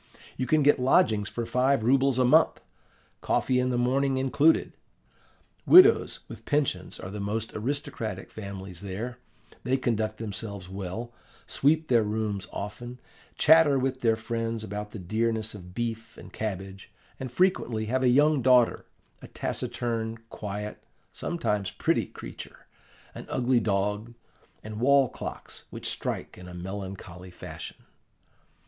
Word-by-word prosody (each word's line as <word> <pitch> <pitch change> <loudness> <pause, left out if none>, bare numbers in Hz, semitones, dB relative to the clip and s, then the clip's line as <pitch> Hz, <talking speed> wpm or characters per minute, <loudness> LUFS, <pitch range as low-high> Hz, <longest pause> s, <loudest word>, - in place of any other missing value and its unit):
You 130 - -2
can 155 -1 +3
get 145 -1 +5
lodgings 110 -5 +3
for 120 - -4
five 130 0 +2
rubles 135 +2 +3
a 130 - +4
month, 125 - +4 0.6
coffee 125 -1 +1
in 125 0 +1
the 125 - 0
morning 135 +2 +1
included. 140 +4 +3 0.9
Widows 380 +5 +7
with - - -10
pensions 140 - -1
are 95 - -7
the 105 - -6
most 110 +3 -2
aristocratic 115 -5 -3
families 95 -4 -8
there; 110 +6 -5 0.4
they 130 +2 +1
conduct 110 -4 -1
themselves 100 -3 -5
well, 100 +5 -6 0.3
sweep 155 +3 +2
their 120 -2 +4
rooms 105 -2 -2
often, 120 +5 -6 0.4
chatter 155 -2 +6
with 130 0 -1
their 115 -2 +3
friends 115 0 -3
about 105 0 -5
the 110 - -8
dearness 110 +3 -1
of 90 -3 -11
beef 115 -1 -4
and - - -12
cabbage, 95 -2 -5 0.3
and 130 -2 -5
frequently 125 -9 +1
have 130 +4 0
a 130 - +4
young 145 +2 +4
daughter, 125 -1 +4 0.3
a - - -10
taciturn, 115 -1 -3
quiet, 105 0 -6 0.3
sometimes 105 - -1
pretty - - 0
creature; - - -10 0.5
an - - -9
ugly 125 -1 +2
dog, 105 +2 -1 0.5
and 110 0 -7
wall 135 +1 +4
clocks - - -8
which - - -6
strike - - -4
in 90 - -10
a 90 - -9
melancholy 95 -1 -7
fashion. 90 - -8
115 Hz, 140 wpm, -27 LUFS, 105-130 Hz, 0.9 s, Widows